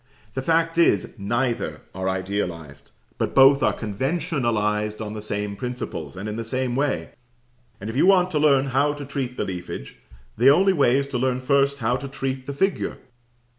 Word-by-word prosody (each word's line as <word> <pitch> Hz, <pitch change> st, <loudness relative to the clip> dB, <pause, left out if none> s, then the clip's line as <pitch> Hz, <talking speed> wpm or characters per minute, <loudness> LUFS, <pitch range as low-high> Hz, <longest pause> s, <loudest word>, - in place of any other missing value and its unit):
The 130 Hz, -, -2 dB
fact 165 Hz, +3 st, +1 dB
is, 105 Hz, -, +3 dB
neither 120 Hz, +4 st, -1 dB
are 95 Hz, 0 st, -2 dB
idealized, 90 Hz, -6 st, -4 dB, 0.3 s
but -, -, -1 dB
both 135 Hz, +1 st, +7 dB
are -, -, +3 dB
conventionalized 110 Hz, -, -1 dB
on 105 Hz, -1 st, -5 dB
the 110 Hz, -, -6 dB
same 105 Hz, -1 st, -3 dB
principles, 100 Hz, -, -5 dB
and 100 Hz, +3 st, -5 dB
in 105 Hz, +1 st, -4 dB
the 115 Hz, -, -3 dB
same 125 Hz, +1 st, -1 dB
way; 140 Hz, +1 st, -1 dB, 0.7 s
and 100 Hz, -, -7 dB
if 110 Hz, -, -5 dB
you 145 Hz, -, +4 dB
want 185 Hz, -2 st, +4 dB
to 155 Hz, -, +1 dB
learn 140 Hz, -2 st, +3 dB
how 145 Hz, +2 st, +3 dB
to 145 Hz, -1 st, -7 dB
treat 130 Hz, -2 st, -4 dB
the -, -, -1 dB
leafage, 90 Hz, -9 st, -7 dB, 0.4 s
the 125 Hz, +5 st, +6 dB
only 190 Hz, +7 st, +5 dB
way 135 Hz, -6 st, +3 dB
is 140 Hz, -, 0 dB
to 125 Hz, -, -2 dB
learn 130 Hz, 0 st, 0 dB
first 140 Hz, +1 st, +2 dB
how 120 Hz, -1 st, 0 dB
to 140 Hz, +2 st, -6 dB
treat 135 Hz, -1 st, -4 dB
the 140 Hz, -, -3 dB
figure. 195 Hz, +8 st, -1 dB
130 Hz, 185 wpm, -23 LUFS, 105-140 Hz, 0.7 s, both